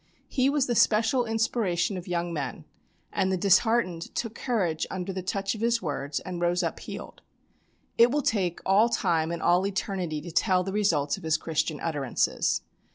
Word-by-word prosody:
He 265 -1 +2
was 285 -2 +2
the 245 - 0
special 230 +3 +3
inspiration 220 -5 0
of 180 -1 -7
young 175 -1 -2
men, 140 -5 -4 0.5
and 190 - +1
the 190 - +1
disheartened 190 -2 +2
took 230 -2 -2
courage 190 -11 -1
under 185 0 -4
the 185 - -3
touch 195 +2 -2
of 220 - -7
his 235 0 +2
words 145 -4 -3
and 180 -2 -6
rose 175 +1 +1
up 165 - -2
healed. - - -8 0.8
It 235 +1 +8
will 290 +3 0
take 185 -8 0
all 205 +5 +4
time 160 -7 +1
and 170 - -4
all 175 +2 +4
eternity 190 -5 -2
to 170 +3 -8
tell 185 +1 +2
the 195 +1 -4
results 165 -9 +1
of - - -12
his 160 -1 +2
Christian 155 -1 -2
utterances. 145 -6 0
185 Hz, 180 wpm, -27 LUFS, 170-225 Hz, 0.8 s, It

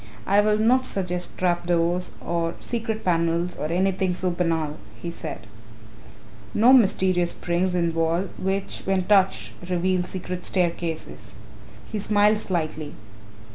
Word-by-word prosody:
"I 200 +2 +4
will 210 0 +2
not 255 +4 +3
suggest 180 -2 -2
trap 175 -1 0
doors, 175 +1 +1
or 170 -1 -1
secret 225 -2 -3
panels 170 0 +1
or 150 - -3
anything 185 +1 0
so 180 0 -1
banal," 165 -4 -1 0.2
he 170 - -5
said, 155 -9 -7 1.1
"nor 235 +5 +6
mysterious 185 -7 +4
springs 180 +1 -1
in 170 -1 +2
the - - -5
wall 165 +2 +1 0.2
which, 195 +1 -2
when 190 -1 +1
touched, 195 0 +2 0.2
reveal 180 +1 +1
secret 180 0 -5
staircases." 170 -3 -2 0.6
He 215 - -2
smiled 210 +1 +3
slightly. 155 -6 -3
180 Hz, 135 wpm, -24 LUFS, 170-195 Hz, 1.1 s, nor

